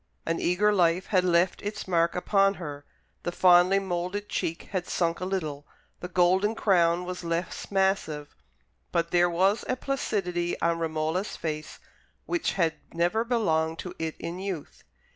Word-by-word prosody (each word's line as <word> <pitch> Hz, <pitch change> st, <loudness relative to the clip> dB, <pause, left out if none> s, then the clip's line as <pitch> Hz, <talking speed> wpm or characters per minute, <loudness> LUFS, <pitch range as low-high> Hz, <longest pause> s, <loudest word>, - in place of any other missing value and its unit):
An 165 Hz, 0 st, -1 dB
eager 205 Hz, +4 st, +2 dB
life 180 Hz, -1 st, +3 dB
had 185 Hz, -3 st, +2 dB
left 175 Hz, 0 st, +2 dB
its 210 Hz, 0 st, -5 dB
marks 170 Hz, -1 st, +2 dB
upon 195 Hz, +2 st, +3 dB
her: 145 Hz, -5 st, -7 dB, 0.4 s
the 175 Hz, -, -3 dB
finely 180 Hz, +1 st, +5 dB
moulded 190 Hz, +2 st, -3 dB
cheek 165 Hz, 0 st, -3 dB
had 185 Hz, -2 st, -2 dB
sunk 170 Hz, -1 st, 0 dB
a 180 Hz, -, -3 dB
little, 155 Hz, -7 st, -3 dB, 0.3 s
the 180 Hz, -, -5 dB
golden 185 Hz, +4 st, +2 dB
crown 175 Hz, -4 st, +3 dB
was 180 Hz, 0 st, -5 dB
less 170 Hz, +1 st, -3 dB
massive; 190 Hz, -7 st, 0 dB, 0.6 s
but 170 Hz, -1 st, 0 dB
there 175 Hz, 0 st, +4 dB
was 190 Hz, +5 st, +2 dB
a 255 Hz, -, +2 dB
placidity 185 Hz, -10 st, -2 dB
on 170 Hz, 0 st, +1 dB
Romola's 160 Hz, +4 st, -1 dB
face 155 Hz, -1 st, -5 dB, 0.5 s
which 345 Hz, -2 st, -1 dB
had 165 Hz, -4 st, +1 dB, 0.2 s
never 175 Hz, +7 st, +2 dB
belonged 165 Hz, -10 st, +1 dB
to 180 Hz, -, -6 dB
it 160 Hz, -1 st, -3 dB
in 170 Hz, +2 st, -5 dB
youth. 190 Hz, -6 st, -6 dB
175 Hz, 155 wpm, -27 LUFS, 165-195 Hz, 0.6 s, finely